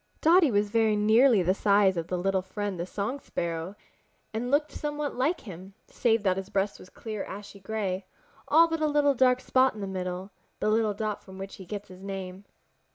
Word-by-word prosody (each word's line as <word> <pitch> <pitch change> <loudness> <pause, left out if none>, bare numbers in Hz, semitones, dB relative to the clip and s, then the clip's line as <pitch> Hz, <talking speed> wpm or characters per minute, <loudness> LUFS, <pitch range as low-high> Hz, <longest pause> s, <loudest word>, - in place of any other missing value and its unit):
Dotty 330 -1 +5
was 205 -2 +1
very 220 -1 +3
nearly 220 +1 +5
the 185 +2 +3
size 200 -1 +3
of 170 +1 -4
Little 190 +1 +1
Friend 195 0 -4
the 170 - -3
Song 210 +9 -3
Sparrow 170 -3 -4 0.6
and 235 +3 -2
looked 290 +3 +2
somewhat 295 -1 -3
like 285 +8 0
him, 190 -1 -10
save 225 -4 +1
that 190 -2 +2
his 195 0 -5
breast 200 0 -1
was 185 - -13
clear 215 -3 -6
ashy 200 0 -9
gray, 195 -2 -3 0.4
all 330 +3 +6
but 325 -1 -3
a 310 - +3
little 290 -1 +3
dark 255 -1 +3
spot 260 -1 +2
in - - -8
the 200 - -3
middle, 185 0 -4 0.3
the - - +1
little 215 -1 +2
dot 215 0 -3
from 190 -1 -12
which 195 0 -7
he 190 - -11
gets 205 +1 -6
his 185 0 -12
name. 195 0 -6
205 Hz, 200 wpm, -28 LUFS, 190-245 Hz, 0.6 s, all